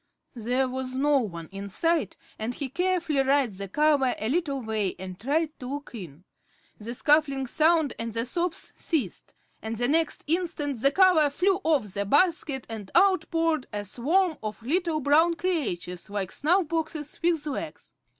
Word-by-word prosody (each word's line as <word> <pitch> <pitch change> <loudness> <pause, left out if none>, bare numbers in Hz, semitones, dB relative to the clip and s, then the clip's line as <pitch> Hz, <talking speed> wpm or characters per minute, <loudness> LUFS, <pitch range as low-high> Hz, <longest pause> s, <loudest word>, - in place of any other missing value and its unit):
There 250 +3 0
was 255 0 -4
no 285 +1 +3
one 170 -9 -5
in 200 +1 -6
sight, 325 - 0 0.2
and 225 +3 -3
he 280 -3 -4
carefully 345 -2 +1
raised 265 -7 +1
the 200 - -4
cover 285 +2 +2
a 220 - -2
little 285 -2 0
way 215 -4 -1
and 185 0 -8
tried 300 +7 0
to 250 - -7
look 290 - -9
in. 175 - -9 0.6
The 230 +3 -5
scuffling 280 -1 +3
sound 315 +2 +2
and 230 0 -3
the 230 +1 -1
sobs 345 +6 -2
ceased, 270 - -3 0.3
and 220 0 -4
the 245 +1 +1
next 320 +2 +1
instant 305 -6 -1
the 275 - +5
cover 360 -4 +5
flew 380 +6 +1
off 275 - +1
the 200 0 -2
basket, 290 - +2
and 215 -4 -7
out 380 -5 +4
poured 325 -4 0
a 205 -1 -4
swarm 320 - +1
of 215 +1 -6
little 325 +3 0
brown 315 +5 +4
creatures, 215 - -3
like 200 -2 -3
snuff 345 +3 +2
boxes 315 -2 -3
with 330 -3 +1
legs. 290 -3 -6
280 Hz, 170 wpm, -27 LUFS, 225-325 Hz, 0.6 s, the